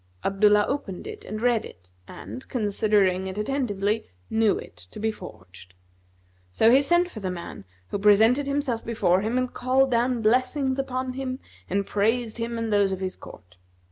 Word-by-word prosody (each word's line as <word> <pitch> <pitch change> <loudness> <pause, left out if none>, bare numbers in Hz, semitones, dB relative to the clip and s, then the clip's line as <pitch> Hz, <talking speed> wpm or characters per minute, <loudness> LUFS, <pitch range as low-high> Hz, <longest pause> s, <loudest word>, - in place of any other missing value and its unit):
Abdullah 205 +1 +4
opened 210 -10 -4
it - - -8
and 215 +2 -5
read 240 -3 +2
it 90 +1 -14 0.2
and, 110 +7 -9
considering 205 -4 +1
it 190 +1 -6
attentively, 210 -3 -1 0.2
knew 220 -2 +3
it - - -10
to - - -10
be 220 +1 0
forged; 90 - -13 0.8
so 220 - +4
he 265 +3 +6
sent 345 +5 +3
for 240 - -9
the 190 -3 -3
man, 170 - -7 0.2
who 205 - -3
presented 220 +7 +4
himself 280 -5 -1
before 195 -5 +1
him 225 +4 -1
and 255 -1 -1
called 260 +1 +2
down 240 0 +1
blessings 255 +4 +1
upon 255 -1 -2
him 260 -1 -4 0.3
and 200 +2 0
praised 225 +3 0
him 230 0 -3
and 225 -2 -2
those 200 -1 +3
of 190 - -3
his 185 -1 -3
court. 90 -1 -14
220 Hz, 170 wpm, -25 LUFS, 195-255 Hz, 0.8 s, he